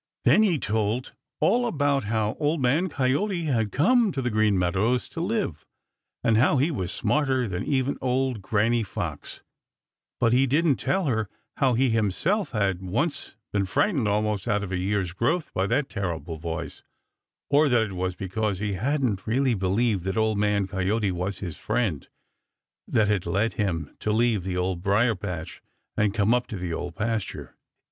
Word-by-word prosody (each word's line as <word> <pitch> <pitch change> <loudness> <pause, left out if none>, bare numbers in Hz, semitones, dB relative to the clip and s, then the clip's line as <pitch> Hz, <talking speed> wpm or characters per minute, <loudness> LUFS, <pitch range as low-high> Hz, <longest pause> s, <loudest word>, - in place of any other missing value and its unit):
Then 215 - +6
he 190 -7 +3
told 110 +1 -1 0.3
all 245 0 +3
about 145 - +1
how 110 0 0
Old 150 +1 +1
Man 140 +9 +2
Coyote 160 +7 0
had 115 -9 0
come 230 - +3
to - - -3
the 125 -2 -1
Green 105 -2 +2
Meadows 100 +8 +1
to 165 - -5
live, 190 - -2 0.6
and 115 -1 +3
how 135 +5 +4
he 145 +6 +2
was 95 - -3
smarter 135 -4 +1
than 90 -2 -3
even 135 -1 0
old 130 -3 0
Granny 115 +4 +1
Fox, 105 - -5 0.8
but 115 -1 +3
he 135 +2 +4
didn't 150 +1 +2
tell 190 -1 0
her 110 -7 0 0.3
how 130 -3 +3
he 130 +1 +2
himself 115 - 0
had 100 -5 0
once 120 - -2 0.2
been 100 -2 +1
frightened 130 - +1
almost 105 -1 0
out 105 0 +1
of 100 - -5
a 95 - 0
year's 95 -1 -1
growth 155 - -1
by 95 +1 0
that 140 +6 +1
terrible 85 - -4
voice, 85 +1 -5 0.7
or 145 +1 +5
that 120 -3 +4
it 105 -3 -5
was 90 0 -2
because 100 +2 -2
he 100 +1 -2
hadn't 115 -2 -1
really 130 +3 +2
believed 100 0 +1
that 95 +3 -2
Old 110 -2 +1
Man 105 -1 +2
Coyote 100 +2 0
was 90 +3 -3
his 85 -6 -5
friend 105 - -1 0.8
that 110 -1 +2
had 105 -4 0
led 100 +6 +1
him 85 -8 -2
to 105 - -1
leave 110 -3 +2
the 90 -1 -2
Old 90 -1 -1
Briar 105 +5 +3
patch 90 -4 -6 0.3
and 105 -1 +2
come 105 +2 +2
up 125 0 0
to 105 - -5
the 90 -2 -4
Old 85 0 -5
Pasture. 110 -1 -3
110 Hz, 175 wpm, -25 LUFS, 95-130 Hz, 0.8 s, Then